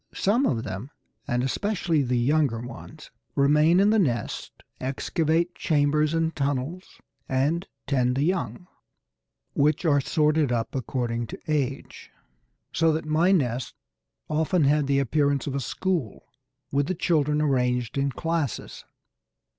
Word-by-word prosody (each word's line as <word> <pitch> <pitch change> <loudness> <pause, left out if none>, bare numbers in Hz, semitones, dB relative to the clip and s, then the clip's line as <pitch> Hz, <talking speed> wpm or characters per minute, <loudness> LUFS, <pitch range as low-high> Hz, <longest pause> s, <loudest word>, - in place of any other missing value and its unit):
Some 230 +8 +2
of 115 -5 -1
them, 100 +8 -6 0.4
and 125 +1 0
especially 170 +2 0
the 125 -2 0
younger 135 -1 +2
ones, 120 +6 -10 0.2
remain 150 +5 +4
in 200 +2 +4
the 220 - +4
nest, 120 - -2 0.2
excavate 160 +6 0
chambers 150 +1 +1
and 165 0 0
tunnels, 145 +6 -3 0.3
and 145 +7 0 0.2
tend 125 -3 +1
the 135 - +1
young, 165 - -1 0.9
which 150 +4 +2
are 145 -3 +4
sorted 150 -1 +2
up 115 -2 -1
according 120 -2 -2
to - - -8
age, 140 -4 -3 0.6
so 165 0 +3
that 155 - -2
my 160 +4 +3
nests 130 -9 0 0.5
often 160 +2 +1
had 145 0 +3
the 140 0 +2
appearance 140 +1 +1
of 140 - -3
a 140 - -1
school, 155 - -2 0.5
with 140 0 +1
the 185 - -1
children 150 -3 +1
arranged 125 -5 0
in 140 0 0
classes. 165 -2 -3
145 Hz, 135 wpm, -25 LUFS, 130-160 Hz, 0.9 s, remain